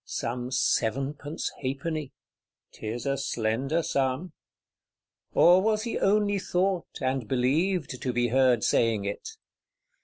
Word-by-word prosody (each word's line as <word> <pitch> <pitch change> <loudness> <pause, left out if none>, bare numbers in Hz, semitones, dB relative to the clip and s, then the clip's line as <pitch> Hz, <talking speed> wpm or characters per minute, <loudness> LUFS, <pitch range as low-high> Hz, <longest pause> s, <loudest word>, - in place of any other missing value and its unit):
Some 120 +1 -4
sevenpence 135 +4 -1
halfpenny: 145 +2 -3 0.6
'tis 115 +4 -5
a 135 -1 0
slender 135 +5 -1
sum! 135 +6 -1 1.0
Or 180 +2 +7
was 215 +1 +1
he 230 - -2
only 205 0 +2
thought, 185 -1 -1
and 130 -3 -1
believed, 140 - 0
to 130 - -1
be 120 0 +1
heard 125 -2 +3
saying 110 -3 +2
it? 270 - -5
135 Hz, 115 wpm, -27 LUFS, 125-175 Hz, 1.0 s, Or